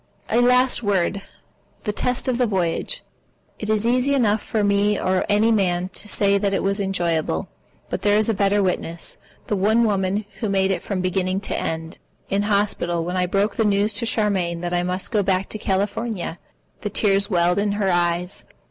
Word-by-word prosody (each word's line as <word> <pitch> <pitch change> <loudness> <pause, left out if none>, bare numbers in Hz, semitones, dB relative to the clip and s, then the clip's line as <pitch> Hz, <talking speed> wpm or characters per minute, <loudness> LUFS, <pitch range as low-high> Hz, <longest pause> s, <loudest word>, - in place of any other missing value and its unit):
A 235 +2 +4
last 250 +1 +4
word: 200 -2 0 0.6
the 210 - -1
test 250 +4 0
of 250 -1 0
the 250 - +3
voyage. 190 - -1 0.6
It 210 - -5
is 215 0 +2
easy 255 +4 +2
enough 220 -5 +2
for 215 -2 -1
me 205 0 +2
or 185 0 0
any 210 +2 +3
man 185 -4 +1
to 200 - -3
say 200 -1 +2
that 200 -1 0
it - - -1
was 195 +1 0
enjoyable. 170 - -1 0.4
But - - -4
there 205 0 +3
is 215 - +2
a 225 - +2
better 200 0 +2
witness, 170 -2 -2 0.3
the 210 - -1
one 215 +4 +3
woman 200 -1 0
who 220 - -1
made 195 -1 +2
it 190 - -1
from 195 -3 -3
beginning 185 +1 0
to - - -3
end. 160 +2 -4 0.3
In 200 +1 +2
hospital 200 -5 0
when 180 +1 -3
I 180 -1 +1
broke 200 +2 0
the 225 - +3
news 205 0 +2
to 215 +3 -1
Charmian 190 -7 0
that 175 0 -3
I 175 - +2
must 180 +1 -3
go 210 - +2
back 190 0 0
to 215 - -4
California, 200 -2 -2 0.4
the 210 - -3
tears 200 -1 +2
welled 175 0 +2
into 205 0 0
her 195 -2 +1
eyes. 175 +1 0
200 Hz, 195 wpm, -22 LUFS, 185-210 Hz, 0.6 s, A